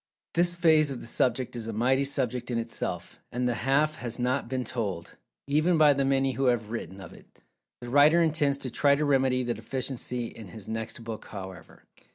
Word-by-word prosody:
This 175 +1 +2
phase 160 -4 +4
of 135 -3 -5
the - - -10
subject 125 +1 0
is 115 -2 -4
a 115 - -4
mighty 130 +5 +2
subject 125 -3 -2
in 120 - -1
itself, 115 0 -4
and 125 +1 -1
"the 120 - +1
half 140 +6 +1
has 120 -2 -5
not 125 0 -1
been 130 -1 -1
told" 100 -10 -4 0.3
even 155 +5 +2
by 150 -2 +6
the 140 0 0
many 135 0 +2
who 135 +1 -1
have 115 -4 +1
written 100 -5 -5
of 95 -4 -10
it. - - -18 0.4
The 120 - -7
writer 145 +5 +6
intends 155 -4 +2
to 130 - -4
try 140 +3 +3
to 150 +1 0
remedy 130 -2 +2
the 120 -1 -1
deficiency 125 +1 -4
in 110 -2 -9
his 95 +3 -10
next 110 +1 -5
book, 115 -1 -7
however. 95 -2 -10
125 Hz, 205 wpm, -28 LUFS, 115-140 Hz, 0.4 s, by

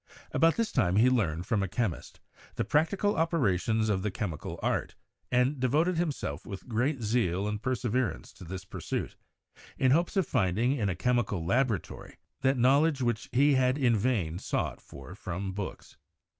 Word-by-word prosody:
About 165 0 +3
this 230 -1 -1
time 95 -8 +2
he 120 +5 +5
learned, 90 -9 0
from 110 -3 0
a 100 - 0
chemist, 100 -3 -3 0.4
the - - 0
prac 150 +8 +2
tical 205 +1 0
operations 110 - +1
of 100 -3 +1
the 105 - -1
chemical 95 - -5
art, - - -1 0.4
and 125 +3 +2
devoted 155 +8 +2
himself 145 - -2
with 100 -1 -8
great 125 +3 0
zeal 105 -4 +1
and 105 0 -3
perseverance 125 -1 -1
to - - -13
this 95 +2 -7
pursuit, - - -4 0.6
in 130 -1 +3
hopes 170 +7 +2
of 190 - +3
finding 115 0 +1
in 115 -8 0
a 90 - -1
chemical 105 -5 0
laboratory 115 - -1 0.2
that 135 0 +2
knowledge 140 +3 +3
which 120 -3 -1
he 140 +3 +4
had 130 0 +2
in 125 -5 +3
vain 100 -7 0
sought - - -2
for 70 +5 -11
from 95 0 -5
books. 95 0 -7
120 Hz, 170 wpm, -29 LUFS, 95-135 Hz, 0.6 s, he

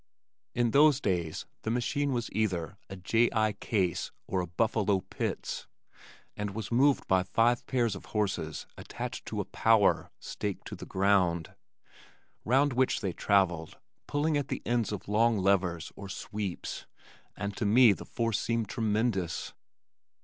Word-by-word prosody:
In 120 -1 +2
those 145 0 +6
days 85 - -1 0.2
the - - -3
machine 140 +5 0
was 120 -2 -2
either 95 -5 -1
a 95 - -6
"J. 115 +6 +2
I. 110 -1 +2
Case" 95 -4 -1
or 95 - -1
a 90 - -4
"Buffalo 100 +1 +1
Pitts," 95 - -4 0.7
and 105 -1 -4
was 110 -1 -5
moved 135 +4 +3
by 95 -1 +4
five 115 +6 +2
pairs 120 -5 +1
of 95 - -9
horses 100 -7 -2
attached - - -6
to - - -3
a - - -1
"power" 110 -3 +3
staked 100 -2 -5
to - - -6
the - - -9
ground, 95 -4 +2 0.9
round 135 +4 +3
which 130 +1 +1
they 95 -4 -2
travelled 90 -6 +1 0.3
pulling 150 +1 +1
at 140 -2 -2
the - - -4
ends 120 -2 0
of 105 - -5
long 110 +2 +3
levers 95 -3 +1
or 100 -1 -8
sweeps, 100 -1 -5 0.5
and 100 -1 -3
to 110 - -1
me 115 +1 +7
the - - -8
force 115 -3 -1
seemed 115 -2 -1
tremendous. 110 -6 -1
105 Hz, 150 wpm, -30 LUFS, 95-120 Hz, 0.9 s, me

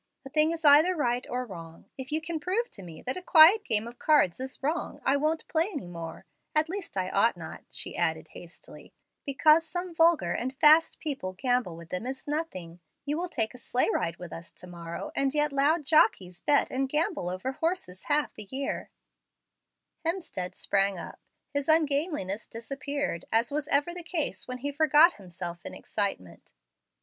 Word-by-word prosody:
A 270 - -9
thing 305 +1 +3
is 330 -1 -4
either 305 +6 +7
right 245 -5 -1
or 250 +1 -2
wrong. 165 -6 -11
If 265 +1 -8
you 310 +1 0
can 325 0 -4
prove 390 +10 -1
to 200 - -7
me 170 -4 -11
that 255 +5 -2
a - - -5
quiet 360 +5 +7
game 220 0 0
of 240 +1 -11
cards 290 - +3
is 265 +1 -7
wrong, 310 +5 -2
I 270 - +4
won't 310 +3 -1
play 330 +3 +1
any 290 - -5
more 170 -2 -8 0.3
at 310 +1 +3
least 365 - -6
I 185 0 -1
ought 225 +4 +3
not," - - -9
she - - -4
added - - -1
hastily. - - -13 0.3
"Because 305 +4 +5
some 350 +3 -5
vulgar 325 - +3
and 260 +6 -3
fast 315 +2 +5
people 265 -12 -4
gamble 245 -3 0
with 165 0 -12
them 185 +7 -4
is 265 +1 -6
nothing. 185 - -4 0.3
You 295 +1 -1
will 360 0 -3
take 225 -7 -2
a 250 - -12
sleigh 245 +1 +1
ride 170 0 -1
with 175 -2 -9
us 165 +1 -9
to - - -9
morrow, 170 - -7
and 275 +1 +2
yet 295 -1 +2
loud 290 +3 +2
jockeys 185 - +3
bet 290 - +2
and 265 +1 -1
gamble 305 - 0
over 185 +8 -3
horses 305 - -3
half 295 0 +1
the 210 - -8
year." 270 +1 -4 1.1
Hemstead 325 - -3
sprang 195 -1 0
up. - - -9 0.3
His 285 +1 -2
ungainliness 290 - +1
disappeared, 275 - -4
as 230 +3 +2
was 295 0 -2
ever 290 +3 +2
the 355 - -6
case 320 - -3
when 255 0 -5
he 285 +3 -4
forgot 315 +3 +5
himself 175 -2 -8
in - - -8
excitement. 195 - -4
275 Hz, 185 wpm, -28 LUFS, 195-315 Hz, 1.1 s, either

